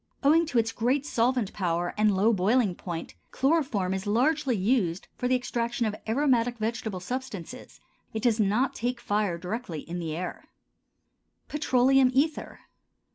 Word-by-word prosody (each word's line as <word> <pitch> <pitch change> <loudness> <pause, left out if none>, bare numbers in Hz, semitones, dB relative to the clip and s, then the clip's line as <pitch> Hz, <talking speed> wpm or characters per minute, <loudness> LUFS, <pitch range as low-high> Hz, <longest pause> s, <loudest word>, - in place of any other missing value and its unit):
Owing 320 +4 +4
to 255 - -1
its 225 -1 +2
great 260 +6 0
solvent 240 -5 0
power 175 -2 -1
and 210 -2 +2
low 220 +4 +4
boiling 205 +1 +2
point, 170 -2 -6 0.2
chloroform 265 - +1
is 190 +2 -4
largely 265 +4 +2
used 195 -4 0
for 250 - -2
the 255 - +3
extraction 240 -1 -1
of 215 - -1 0.2
aromatic 245 -2 +2
vegetable 220 -3 -3
substances; 250 0 -6 0.3
it 220 - -4
does 235 -3 +2
not 215 +6 +2
take 245 +1 -2
fire 205 -6 0
directly 180 -2 -5
in 175 +1 -6
the 160 -2 -3
air. 180 +1 -5 1.0
PETROLEUM 270 -3 +3
ETHER. 300 +3 0
230 Hz, 145 wpm, -27 LUFS, 190-255 Hz, 1.0 s, Owing